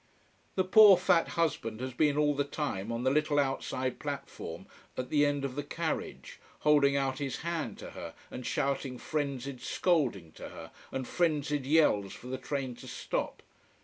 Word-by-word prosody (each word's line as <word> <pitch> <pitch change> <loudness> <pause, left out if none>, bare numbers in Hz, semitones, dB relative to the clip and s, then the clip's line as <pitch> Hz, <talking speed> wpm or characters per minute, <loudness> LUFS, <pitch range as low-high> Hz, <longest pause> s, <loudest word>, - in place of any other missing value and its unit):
The 185 - +3
poor 200 0 +8
fat 180 -2 +3
husband 125 -9 0
has 130 0 -4
been 145 +2 +2
all 150 -1 +3
the 145 0 +1
time 140 -8 -3
on 115 +1 -2
the 130 - +3
little 150 0 +2
outside 135 -2 -1
platform 140 - -6 0.3
at 125 0 -4
the 145 -1 +4
end 145 -1 -1
of 135 - -3
the 145 - -2
carriage, 160 +3 -4 0.2
holding 145 -2 +4
out 135 -1 -1
his 135 -4 -3
hand 170 -2 -3
to - - -9
her - - -8 0.2
and 125 - -6
shouting 135 0 -1
frenzied 140 -3 -3
scolding 130 - 0
to - - -9
her - - -10 0.2
and 130 -2 -3
frenzied 150 -5 0
yells 135 -11 +3
for - - -12
the 130 +1 -4
train 130 -1 -3
to - - -11
stop. - - -3
140 Hz, 175 wpm, -31 LUFS, 130-150 Hz, 0.3 s, poor